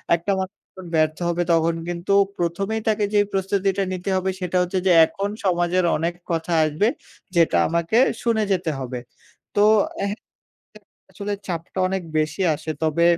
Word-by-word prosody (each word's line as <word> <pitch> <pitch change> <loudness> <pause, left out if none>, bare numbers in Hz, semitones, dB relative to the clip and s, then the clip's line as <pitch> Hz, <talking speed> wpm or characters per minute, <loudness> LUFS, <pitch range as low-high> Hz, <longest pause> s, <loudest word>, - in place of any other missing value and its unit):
একটা 175 +4 -2
মানুষ 190 +2 -4
যখন 185 -1 -12
ব্যর্থ 155 0 +2
হবে 175 +1 0
তখন 165 0 +2
কিন্তু 175 +2 -3 0.3
প্রথমেই 195 +6 -1
তাকে 215 -1 +2
যেই 205 0 +4
প্রস্তুতিটা 195 0 0
নিতে 185 +1 -4
হবে। 185 0 0
সেটা 180 0 -1
হচ্ছে 180 +1 0
যে - - +5
এখন 200 +4 -4 0.2
সমাজের 175 0 +2
অনেক 170 +2 -1 0.2
কথা 165 +1 -1
আসবে 155 +7 +1 0.5
যেটা 165 -1 +4
আমাকে 170 +6 0 0.3
শুনে 225 -2 +2
যেতে 180 -4 0
হবে। 125 -1 -4 0.6
তো 205 - +3 0.5
হ্যাঁ 205 - -4 0.9
আসলে 205 0 -5
চাপটা 170 +1 -5
অনেক 190 0 -2 0.2
বেশি 155 +5 -1
আসে। 155 - -6
তবে 160 +2 +2
180 Hz, 155 wpm, -22 LUFS, 165-195 Hz, 0.9 s, যে